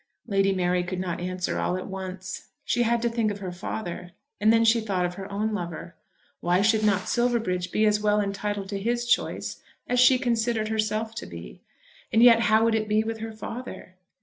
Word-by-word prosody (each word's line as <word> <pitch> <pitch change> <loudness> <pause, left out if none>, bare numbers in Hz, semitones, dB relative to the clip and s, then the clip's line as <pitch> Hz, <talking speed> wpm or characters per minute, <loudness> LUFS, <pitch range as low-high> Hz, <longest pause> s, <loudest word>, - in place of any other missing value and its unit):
Lady 195 -3 +2
Mary 180 -1 +1
could 180 +1 -4
not 180 -2 -3
answer 180 0 -2
all 180 - 0
at 185 - -5
once. 190 -1 -6 0.2
She 245 - +1
had 235 0 +1
to - - +3
think 230 -2 0
of 205 - -4
her 190 -3 -5
father; 180 -1 -6 0.3
and 215 +1 +4
then 230 0 +4
she 230 +1 +4
thought 195 -4 -1
of 175 - -3
her 195 +2 -8
own 215 +2 -1
lover. 170 -3 -5 0.5
Why 180 +3 +2
should 220 0 +3
not 200 -2 +2
Silverbridge 225 -7 0
be 215 - +2
as 210 0 +3
well 210 0 +2
entitled 200 0 -2
to 200 -1 -3
his 240 +3 -1
choice 240 - -1 0.2
as 250 0 0
she 255 +1 +7
considered 230 -3 0
herself 220 0 -1
to 225 - -6
be? 75 -8 -10 0.5
And 225 - +5
yet 235 -2 +8
how 220 -1 +4
would 230 0 +3
it 215 -1 0
be 215 +1 +3
with 225 0 -4
her 225 0 -5
father? 230 -2 -8
210 Hz, 205 wpm, -26 LUFS, 185-225 Hz, 0.5 s, yet